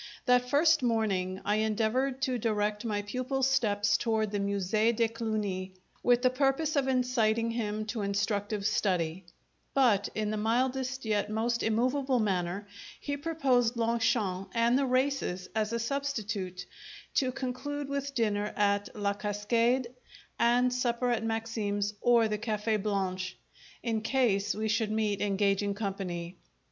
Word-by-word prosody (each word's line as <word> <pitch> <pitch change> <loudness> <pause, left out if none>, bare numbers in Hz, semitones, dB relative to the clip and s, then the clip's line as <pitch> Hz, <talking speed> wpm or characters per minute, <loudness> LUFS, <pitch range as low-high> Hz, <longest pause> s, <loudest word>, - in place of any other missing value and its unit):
That 250 0 +3
first 310 +2 +4
morning 200 -6 0
I 210 +1 +2
endeavoured 225 +5 0
to 255 -2 0
direct 210 -1 0
my 205 -2 -1
pupil's 255 +5 -1
steps 205 -6 +2
toward 220 -2 0
the 205 - -1
Musee 200 +3 +1
de 230 0 +2
Cluny, 210 -5 -3 0.3
with 245 0 +3
the 255 - +4
purpose 275 +4 +1
of 275 -2 +2
inciting 230 -3 +1
him 215 -2 -2
to 220 0 -3
instructive 205 0 -1
study; 180 -4 0 0.5
but 235 -7 +3
in 215 -1 -1
the 215 - -2
mildest, 255 +4 0
yet 210 -1 0
most 230 +2 0
immovable 255 +4 +1
manner, 195 -2 -1 0.3
he 285 - -3
proposed 270 -6 +1
Longchamps 225 -5 0
and 235 +1 +3
the 275 0 +2
races 255 -8 0
as 215 -1 0
a 235 - 0
substitute, 215 -8 -3 0.5
to 260 -2 +2
conclude 270 +2 -4
with 280 0 -3
dinner 210 -3 0
at 205 0 +2
La 205 -1 0
Cascade 230 +5 +1 0.5
and 245 +1 +3
supper 245 0 0
at 230 -2 0
Maxim's 220 -2 -2
or 235 -2 +4
the 210 -1 -2
Cafe' 215 0 0
Blanche, 190 -2 -2 0.5
in 225 -2 -1
case 215 -5 +1
we 215 +1 -2
should 215 0 +1
meet 215 -2 0
engaging 200 0 +1
company. 190 -4 -4
220 Hz, 140 wpm, -30 LUFS, 205-250 Hz, 0.5 s, first